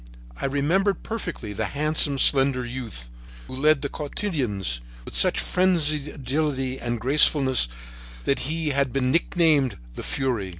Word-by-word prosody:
I - - -4
remembered 170 +8 0
perfectly 170 - -5
the 110 +2 -2
handsome, 150 -1 +2
slender 135 -2 +3
youth 120 - -7 0.4
who - - -8
led 150 +1 +2
the - - 0
cotillons 130 - -2 0.2
with - - -9
such - - +5
frenzied 155 -6 +1
agility 135 -2 -2
and 120 0 -3
gracefulness 135 - +3 0.6
that 140 - 0
he 160 -1 -1
had 140 -2 0
been 130 0 0
nicknamed 155 - +2 0.2
"the - - -7
fury." 125 -8 -2
140 Hz, 135 wpm, -24 LUFS, 125-155 Hz, 0.6 s, such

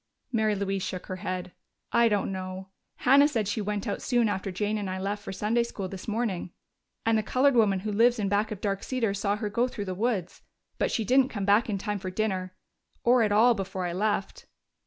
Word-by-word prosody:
Mary 220 -3 +2
Louise 195 -1 -2
shook 185 -1 -4
her 185 - -5
head. 185 -1 -4 0.4
"I 235 -1 +4
don't 205 -2 0
know. 185 0 -6 0.4
Hannah 280 +3 +7
said 225 -8 -1
she 205 +2 -1
went 205 0 -2
out 200 - -2
soon 240 -3 +2
after 195 -1 -2
Jane 210 +3 -1
and 200 -2 -3
I 185 - -3
left 200 +2 -3
for - - -6
Sunday 215 +5 +1
school 210 -5 -4
this 185 0 -8
morning, 215 -5 -2 0.6
and 225 -1 +3
the - - +1
colored 260 +6 +3
woman 205 -5 +3
who 215 +2 -3
lives 235 +4 +4
in 210 -2 -1
back 205 +2 +1
of 210 -2 -6
Dark 195 -2 -1
Cedars 225 -6 -1
saw 200 0 +1
her 210 0 -3
go 235 +4 +1
through 205 -5 -5
the 185 - -3
woods. 200 -3 -2 0.4
But - - +2
she 225 - -1
didn't 260 +2 +4
come 205 -7 -3
back 210 +5 +4
in 200 - 0
time 205 +1 -3
for 185 0 -4
dinner 185 -2 -2 0.5
or 245 +1 +5
at 215 -2 +2
all, 230 +4 +6
before 190 -3 -4
I 175 - -2
left." 200 +1 -2
205 Hz, 225 wpm, -27 LUFS, 190-225 Hz, 0.6 s, Hannah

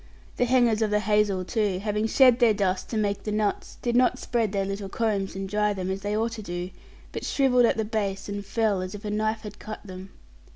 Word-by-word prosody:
The 245 - +3
hangers 240 -3 +3
of 220 - +2
the 210 0 +1
hazel, 210 -2 +1
too, 205 -3 0
having 210 +2 -1
shed 250 0 +5
their 230 -4 +5
dust 190 -2 -1
to 225 - -2
make 205 -2 0
the 210 - -4
nuts, 210 -1 -1
did 240 -1 0
not 250 0 +4
spread 230 -5 -1
their 195 -1 0
little 195 0 -4
combs 205 -3 -1
and 195 0 -4
dry 210 +1 +1
them, 190 -1 -3
as 190 +1 -4
they 205 +1 -1
ought 225 +1 0
to 225 -1 -6
do; 175 -1 -5 0.4
but - - -5
shrivelled 250 -3 +3
at 230 - +2
the 220 - 0
base 205 -3 -2
and 205 0 -4
fell, 210 -2 0
as 185 +2 -5
if 205 - -9
a 210 - -2
knife 215 +1 -1
had 210 -1 -9
cut 215 0 -8
them. 185 0 -9
210 Hz, 240 wpm, -26 LUFS, 195-225 Hz, 0.4 s, shed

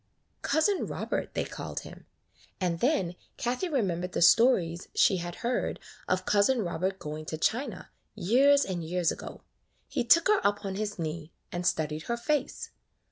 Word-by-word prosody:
Cousin 370 +5 +1
Robert - - -3
they - - 0
called - - -6
him; - - -12 0.5
and 175 -3 -1
then 245 - +1 0.2
Kathie 250 +10 -1
remembered 185 - -1
the - - -1
stories 175 -5 +4
she 190 - +4
had 175 0 -5
heard 245 +1 -1 0.3
of 185 0 0
Cousin 210 +4 +3
Robert 185 +2 -2
going 155 -3 -6
to 155 - -4
China 230 - -2 0.2
years 275 +9 +4
and 180 -3 -3
years 175 +1 0
ago. - - -8 0.4
He - - -1
took 335 +8 +5
her 420 -1 +4
up 205 0 +1
on 195 - -2
his 205 +1 -3
knee 160 -1 -4 0.2
and 175 +1 -2
studied 155 -2 0
her 235 - -1
face. 285 +2 -2
190 Hz, 160 wpm, -29 LUFS, 170-250 Hz, 0.5 s, took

